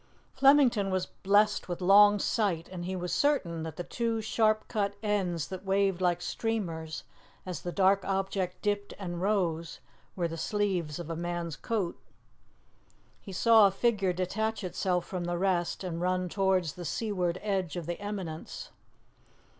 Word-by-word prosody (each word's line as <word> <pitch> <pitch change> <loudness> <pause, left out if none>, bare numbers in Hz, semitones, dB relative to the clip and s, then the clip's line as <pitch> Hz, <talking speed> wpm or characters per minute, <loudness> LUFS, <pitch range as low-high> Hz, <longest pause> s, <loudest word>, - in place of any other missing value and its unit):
Flemington 265 -7 +5
was 185 -1 0
blessed 205 0 +2
with 175 - -3
long 205 +3 +7
sight, 195 -6 0
and 175 -2 -6
he 185 +1 -3
was 180 -1 -3
certain 190 - +1
that 160 -1 -5
the 175 - -4
two 230 +3 -2
sharp 215 0 +1
cut 200 -3 -1
ends 185 -7 -1
that 185 0 -6
waved 195 -1 +1
like 175 -1 +1
streamers 170 -9 -3 0.4
as 180 -4 -5
the 175 - -4
dark 195 +1 +3
object 190 -1 -2
dipped 205 -1 -1
and 175 -3 -5
rose, 170 -5 0 0.4
were 175 -2 0
the 165 0 -6
sleeves 185 -6 -1
of 170 -1 -6
a - - -2
man's 170 -1 -3
coat. 200 -2 -2 1.2
He 195 - -9
saw 220 +2 +6
a - - 0
figure 195 -2 +1
detach 215 +5 -2
itself 180 -1 -1
from 180 -2 -4
the 175 0 -1
rest 180 -1 0
and 170 -2 -4
run 185 0 0
towards 190 -4 +1
the 180 - -8
seaward 185 -2 -1
edge 190 -6 -1
of 175 -2 -4
the 175 +1 -4
eminence. 195 -6 -6
185 Hz, 160 wpm, -29 LUFS, 175-205 Hz, 1.2 s, long